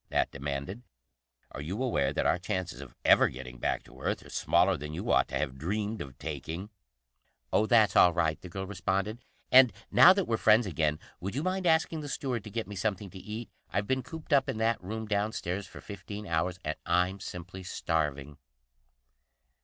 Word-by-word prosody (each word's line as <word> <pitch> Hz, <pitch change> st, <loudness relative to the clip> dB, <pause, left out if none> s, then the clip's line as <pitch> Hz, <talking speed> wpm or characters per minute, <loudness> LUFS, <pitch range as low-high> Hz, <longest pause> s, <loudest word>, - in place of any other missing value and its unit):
Nat -, -, +1 dB
demanded. 70 Hz, -, -4 dB, 0.7 s
"Are 70 Hz, -, -6 dB
you 95 Hz, -, -3 dB
aware 125 Hz, -, +1 dB
that -, -, -1 dB
our -, -, +3 dB
chances 95 Hz, -2 st, -3 dB
of -, -, -11 dB
ever -, -, +7 dB
getting 60 Hz, -1 st, -9 dB
back -, -, -1 dB
to 65 Hz, +2 st, -15 dB
Earth -, -, -2 dB
are -, -, -12 dB
smaller 90 Hz, +3 st, +3 dB
than 75 Hz, 0 st, -6 dB
you -, -, -2 dB
ought -, -, +4 dB
to -, -, -2 dB
have 65 Hz, 0 st, -3 dB
dreamed 105 Hz, +6 st, -2 dB
of 65 Hz, -2 st, -8 dB
taking?" 80 Hz, -, -5 dB, 0.8 s
"Oh, 110 Hz, -, +3 dB
that's 110 Hz, -3 st, +5 dB
all 90 Hz, -, +7 dB
right," 80 Hz, -2 st, 0 dB
the 90 Hz, -, -9 dB
girl 95 Hz, +2 st, -4 dB
responded. 100 Hz, +3 st, -2 dB, 0.3 s
"And 130 Hz, -2 st, +8 dB, 0.2 s
now 180 Hz, -, +9 dB
that 195 Hz, -1 st, 0 dB
we're 115 Hz, -, 0 dB
friends 110 Hz, +2 st, +5 dB
again, 80 Hz, -5 st, 0 dB, 0.2 s
would 95 Hz, +5 st, -4 dB
you 145 Hz, -, -1 dB
mind 185 Hz, 0 st, 0 dB
asking 160 Hz, -1 st, +2 dB
the 145 Hz, -, -6 dB
steward 130 Hz, -5 st, -2 dB
to -, -, -7 dB
get 115 Hz, +2 st, -3 dB
me 100 Hz, -, -7 dB
something 100 Hz, -1 st, -2 dB
to 95 Hz, -, -9 dB
eat? 110 Hz, +4 st, -7 dB, 0.2 s
I've 100 Hz, -, -1 dB
been 130 Hz, +4 st, 0 dB
cooped 160 Hz, +1 st, -6 dB
up 135 Hz, -2 st, +4 dB
in -, -, -2 dB
that 115 Hz, -2 st, +1 dB
room 110 Hz, +4 st, -4 dB
downstairs 100 Hz, -2 st, -2 dB
for -, -, -11 dB
fifteen 100 Hz, +1 st, -8 dB
hours, 85 Hz, +1 st, 0 dB
and 75 Hz, +1 st, -2 dB
I'm 90 Hz, +3 st, +1 dB
simply 90 Hz, 0 st, -7 dB
starving." 75 Hz, -5 st, -2 dB
95 Hz, 195 wpm, -30 LUFS, 80-110 Hz, 0.8 s, now